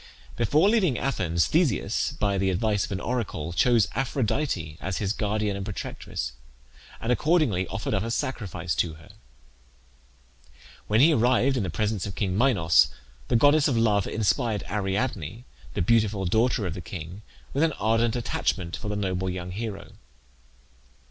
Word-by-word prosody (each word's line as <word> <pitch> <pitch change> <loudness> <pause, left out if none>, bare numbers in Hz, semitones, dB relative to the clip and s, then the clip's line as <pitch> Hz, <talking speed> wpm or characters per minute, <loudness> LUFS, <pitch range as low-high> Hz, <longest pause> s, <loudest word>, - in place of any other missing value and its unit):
Before 145 - +3
leaving 195 - +3
Athens 85 -11 0
Theseus, 155 - +1
by 100 -2 0
the 95 0 +2
advice 105 +2 +1
of - - -10
an 95 - -2
oracle, 100 -10 -3
chose 115 +4 +4
Aphrodite 125 - -1
as 95 0 -3
his 100 -1 -1
guardian 105 -2 -1
and 100 - -4
protectress, 95 - -5 0.7
and 115 - -1
accordingly 125 - +2
offered 100 +2 -3
up 95 - +1
a 115 - -3
sacrifice 105 - -3
to 80 -3 0
her. 80 +1 -16 1.8
When 105 +3 +3
he 160 +3 +6
arrived 125 +1 +3
in 125 - 0
the 95 - -2
presence 105 +3 -1
of 95 - -7
king 95 -4 -1
Minos, 95 - +4 0.4
the - - +1
goddess 145 +5 +5
of 130 -5 +1
Love 105 -4 +2
inspired 110 -1 0
Ariadne, 105 - -2 0.3
the - - +1
beautiful 105 -1 +2
daughter 110 +3 +2
of 90 - -2
the 90 - -6
king, 85 +3 -8 0.3
with 140 - 0
an 160 -2 +3
ardent 115 0 +1
attachment 95 -6 -1
for 110 - -7
the 105 - -2
noble 95 -2 -1
young 90 0 -5
hero. 105 0 -5
105 Hz, 155 wpm, -26 LUFS, 95-120 Hz, 1.8 s, he